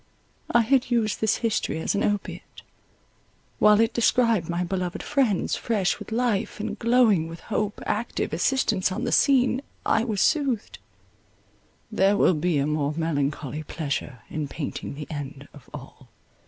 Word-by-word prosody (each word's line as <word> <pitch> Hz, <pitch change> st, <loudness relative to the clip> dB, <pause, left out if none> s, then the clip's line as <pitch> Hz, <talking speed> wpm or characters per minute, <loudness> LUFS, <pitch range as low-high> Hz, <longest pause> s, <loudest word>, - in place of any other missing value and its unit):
I 235 Hz, -, +4 dB
had 255 Hz, +3 st, +2 dB
used 230 Hz, -3 st, 0 dB
this 220 Hz, -1 st, +3 dB
history 215 Hz, -7 st, 0 dB
as 160 Hz, -, -1 dB
an 200 Hz, -, 0 dB
opiate; 205 Hz, -1 st, -3 dB, 1.0 s
while 210 Hz, 0 st, +6 dB
it 225 Hz, +1 st, +2 dB
described 230 Hz, -6 st, +2 dB
my 170 Hz, +1 st, -1 dB
beloved 180 Hz, -1 st, -3 dB
friends, 260 Hz, -10 st, +1 dB
fresh 205 Hz, -6 st, 0 dB
with -, -, -9 dB
life 225 Hz, -3 st, -1 dB
and 210 Hz, -, -4 dB
glowing 230 Hz, -8 st, +3 dB
with 165 Hz, 0 st, -9 dB
hope, 210 Hz, -2 st, -2 dB
active 220 Hz, -6 st, -2 dB
assistants 190 Hz, 0 st, +1 dB
on -, -, -3 dB
the -, -, -1 dB
scene, 260 Hz, -2 st, +3 dB, 0.2 s
I 225 Hz, -, +2 dB
was 220 Hz, -4 st, -2 dB
soothed; 275 Hz, -7 st, 0 dB, 1.1 s
there 195 Hz, +1 st, +3 dB
will 185 Hz, -, +4 dB
be 165 Hz, 0 st, 0 dB
a 140 Hz, -, +1 dB
more 150 Hz, -1 st, -1 dB
melancholy 150 Hz, -2 st, -2 dB
pleasure 140 Hz, -6 st, -4 dB
in 155 Hz, -2 st, -4 dB
painting 140 Hz, -1 st, -5 dB
the 150 Hz, +1 st, -6 dB
end 145 Hz, -1 st, -7 dB
of 145 Hz, -, -16 dB
all. 135 Hz, -2 st, -11 dB
195 Hz, 155 wpm, -25 LUFS, 155-230 Hz, 1.1 s, while